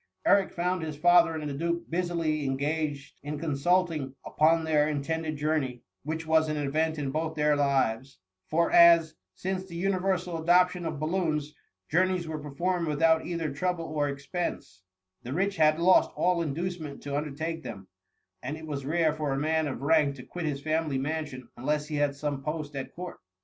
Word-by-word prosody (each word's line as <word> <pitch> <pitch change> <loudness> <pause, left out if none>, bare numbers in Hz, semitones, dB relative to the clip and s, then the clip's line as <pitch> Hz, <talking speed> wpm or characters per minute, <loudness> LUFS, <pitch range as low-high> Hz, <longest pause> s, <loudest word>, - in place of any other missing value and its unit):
Edric 200 -1 +4
found 180 +1 -1
his 155 -2 -5
father 175 0 +5
and 155 -1 -4
the 145 - -3
duke 170 +4 -2
busily 170 -3 -1
engaged 145 +1 -2
in 150 +1 -5
consulting 155 -1 0
upon 160 +2 +3
their 155 -1 +2
intended 155 +2 -2
jour 155 +2 +1
ney, 125 -4 -6 0.2
which 160 +3 -4
was 160 0 +3
an 155 - -1
event 155 +3 0
in 140 -2 -2
both 160 +2 -2
their 150 -1 +3
lives; 135 -3 0 0.3
for 170 +2 +2
as, 170 -2 +7 0.2
since 190 - -3
the 170 - -9
universal 185 -2 -1
adoption 180 +1 +3
of 155 -3 -4
balloons* 155 -2 -1 0.3
journeys 180 0 +1
were 155 -1 -4
performed 170 +4 -2
without 160 +2 +2
either 165 -4 -2
trouble 175 +2 -1
or 150 -2 -1
expense, 140 - -4 0.4
the 125 - -6
rich 195 +4 0
had 155 -1 +4
lost 180 +2 +5
all 180 -1 +2
inducement 160 -1 -4
to 140 -1 -3
undertake 155 +3 -3
them, 95 -10 -8 0.5
and 145 +5 -4
it 160 - -9
was 145 -3 -4
rare 160 0 +2
for 150 -2 -2
a - - -1
man 160 +2 +1
of 135 -2 -5
rank 145 -2 +3
to 125 - -10
quit 175 +4 -6
his 140 -2 -2
family 155 -3 0
mansimi 150 -1 -3
unless 150 +4 -1
he 150 - -2
had 145 -1 +1
some 140 -1 -3
post 150 0 -4
at 135 -1 -5
court. 180 +1 -7
155 Hz, 180 wpm, -28 LUFS, 145-170 Hz, 0.5 s, as